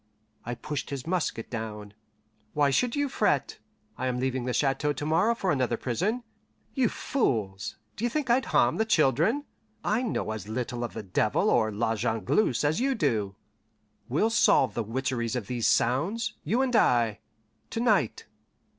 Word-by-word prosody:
I 120 +1 -4
pushed 150 +1 -5
his 140 -3 -5
musket 165 -10 -2
down. 105 -3 -5 0.6
"Why 145 -1 +3
should 240 - +1
you 285 0 +1
fret? 210 - 0 0.4
I 130 - -1
am 125 -1 -1
leaving 130 -1 -1
the 125 - -1
chateau 145 +3 +1
to 145 - -5
morrow 175 +9 +3
for 190 -5 0
another 130 -4 0
prison. 200 - -1 0.5
You 260 -4 +2
fools, 105 - -1 0.2
d'ye 240 +2 -1
think 295 +2 -2
I'd 250 +2 +3
harm 125 -5 +3
the 220 - +2
children? 175 - +2 0.4
I 215 +4 +1
know 220 - -2
as 110 -1 -6
little 120 +1 -3
of 120 - -4
the - - -5
devil 95 - +1
or 110 0 +3
La 110 +2 0
Jongleuse 115 - +1
as 150 +2 +1
do 270 +2 +1
you. 105 -9 0 0.7
We'll 185 - +2
solve 210 - +4
the 120 - -1
witcheries 120 0 -2
of 120 -5 -2
these 120 +1 -1
sounds, 165 - +1
you 230 - +1
and 250 -2 0
I, 120 - +3 0.5
to - - -3
night. 210 - +1
135 Hz, 165 wpm, -27 LUFS, -, 0.7 s, solve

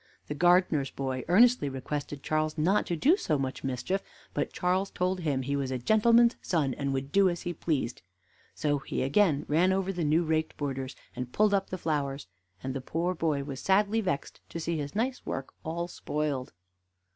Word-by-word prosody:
The - - -4
gardener's 175 -4 +3
boy 130 -2 -3
earnestly 230 - +5
requested 140 +1 -5
Charles 155 +1 0
not 180 +7 +2
to 175 - 0
do 290 - +4
so 155 - 0
much 135 -1 -3
mischief; 135 +9 -1 0.3
but 145 - -1
Charles 185 +2 0
told 185 +1 -1
him 145 -6 -1
he 140 +2 -1
was 140 -2 -1
a 130 - -1
gentleman's 230 - +4
son, 150 -7 0
and 140 +1 -2
would 135 +1 -3
do 195 -1 +5
as 175 -1 -4
he 175 - -2
pleased. 145 -7 -2 0.5
So 145 -2 0
he 135 - -3
again 145 +1 +3
ran 170 +5 +3
over 190 0 0
the 175 -2 -2
new 155 +3 +3
raked 160 -1 -1
borders, 135 -2 -3 0.2
and 125 0 -5
pulled 210 +5 +3
up 195 -1 +1
the 185 - -3
flowers; 145 -4 -2 0.4
and 130 0 -3
the 135 - -4
poor 170 +7 -1
boy 155 -5 0
was 135 -2 -6
sadly 205 +5 +2
vexed 140 -9 -3
to 170 - -5
see 165 +1 -2
his 145 0 -4
nice 250 +4 -1
work 135 0 -5
all 170 +2 -3
spoiled. 150 -6 -3
155 Hz, 190 wpm, -29 LUFS, 140-185 Hz, 0.5 s, earnestly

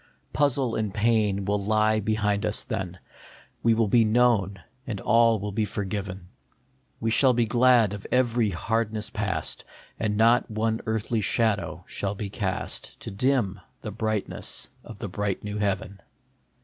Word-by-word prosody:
Puzzle 135 -4 +1
and 110 -3 -1
pain 105 -2 +1
will 100 0 0
lie 110 +1 +2
behind 105 -1 0
us - - -1
then; 95 -2 -4 0.7
All 115 -1 +4
will 115 -1 +2
be 115 +3 +5
known 110 -4 +2 0.3
and 105 -5 -3
all 115 0 +4
will 105 +1 -4
be 105 +2 0
forgiven. 95 -2 -4 0.7
We 115 - 0
shall 130 +3 +5
be 120 -1 +2
glad 120 -2 +4
of 105 - -7
every 120 -3 +2
hardness 110 +3 -2
past, - - -2 0.4
And 105 -2 0
not 115 +3 +4
one 110 +1 -1
earthly 110 +1 0
shadow 105 -4 0
shall 100 0 -3
be 100 -1 -5
cast 95 -4 -3
To - - -6
dim 105 -2 +1 0.2
the 105 - -5
brightness 110 - -3
of 110 - -10
the 105 - -5
bright 100 +1 -2
new 105 0 -4
heaven. 100 -1 -2
110 Hz, 150 wpm, -26 LUFS, 100-115 Hz, 0.7 s, be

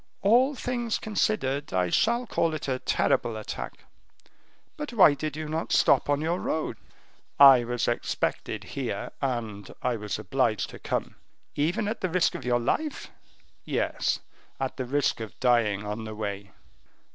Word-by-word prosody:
"All 250 +8 +4
things 240 -2 -2
considered, 145 - -1
I 90 -1 +2
shall 235 +2 +2
call 165 -7 0
it 150 - -5
a 130 -1 -1
terrible 115 -2 +1
attack. 110 - -7 0.9
But 295 -5 -6
why 190 -10 +7
did 150 0 -4
you 155 0 -4
not 160 +2 -3
stop - - +4
on 145 0 +2
your 170 +3 0
road?" 160 - -2 0.6
"I 135 -3 +9
was 120 0 -1
expected 120 - -2
here, - - -4
and 115 -6 -3
I 125 -2 +1
was 105 -1 -4
obliged 110 +1 0
to - - -10
come." - - -3 0.4
"Even 165 +8 0
at 220 - -3
the 185 - 0
risk 180 +1 +2
of - - -6
your 120 -1 +2
life?" 300 - -2 0.5
"Yes, - - -1 0.4
at 135 -1 -2
the 130 - -2
risk 140 -1 0
of 110 -5 -8
dying 115 -5 +2
on 105 +2 -4
the 110 0 -6
way." 100 -2 -4
135 Hz, 160 wpm, -27 LUFS, 115-180 Hz, 0.9 s, I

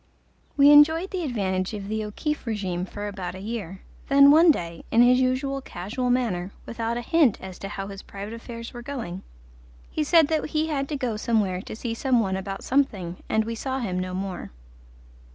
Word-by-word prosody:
We 285 +1 +8
enjoyed 320 +5 +6
the 375 -2 -2
advantage 195 - -1
of 200 -1 -6
the 215 +1 -2
O'Keefe 255 +7 -4
regime 190 -5 -2
for 205 +2 -6
about 190 -3 -5
a - - -8
year, 200 -3 -5 0.3
then 280 0 +7
one 325 +3 +7
day, 170 - 0
in 235 +2 +5
his 250 +1 +5
usual 265 +2 0
casual 240 +4 -4
manner, 225 -8 0 0.2
without 230 0 -3
a - - -2
hint 285 -3 +3
as 190 -1 -9
to 195 - -5
how 195 -1 -5
his 195 0 -8
private 200 +2 -8
affairs 230 0 -8
were 240 - -7
going, 235 -9 -5 0.7
he 310 - 0
said 320 0 +5
that 315 -1 +1
he 310 +1 -1
had 275 -2 -2
to 295 - -2
go 245 -5 -2
somewhere 210 -5 0
to - - -8
see 230 +1 -4
some 250 +1 +2
one 190 -4 0
about 195 0 -5
something, 200 -11 0
and 220 0 +2
we 230 - -3
saw 260 +3 -3
him 190 -8 -2
no 185 0 -3
more. 190 -1 -4
230 Hz, 200 wpm, -25 LUFS, 195-275 Hz, 0.7 s, We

